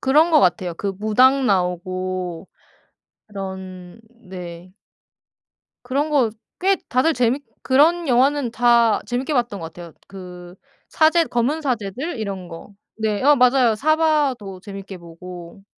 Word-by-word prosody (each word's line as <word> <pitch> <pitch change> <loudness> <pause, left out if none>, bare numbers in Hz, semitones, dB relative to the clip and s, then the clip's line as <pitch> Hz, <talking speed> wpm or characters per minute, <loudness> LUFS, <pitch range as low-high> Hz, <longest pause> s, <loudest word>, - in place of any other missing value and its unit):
그런 300 +5 +3
것 305 -3 +5
같아요. 175 -1 +1
그 200 - -4
무당 255 +5 +3
나오고 185 -1 -2 0.8
그런 190 -1 -8 0.3
네. 180 -1 -9 1.1
그런 280 +5 -1
거 260 -7 +2 0.3
꽤 385 +1 +3
다들 260 +7 +2
재밌 250 +2 0 0.2
그런 320 +6 +3
영화는 260 0 +2
다 235 -2 +3
재밌게 255 +5 -3
봤던 235 -5 -1
것 165 -2 -8
같아요. 170 -2 -11
그 180 -2 -11 0.3
사제 325 +1 +3
검은 270 +5 -1
사제들 250 - -3
이런 195 -4 -5
거. 165 +4 -11 0.3
네 215 -2 -1
어 295 +1 +7
맞아요. 250 -3 +4
사바하도 285 - 0
재밌게 195 -2 -9
보고. 175 +2 -11
220 Hz, 240 characters per minute, -21 LUFS, 185-270 Hz, 1.1 s, 어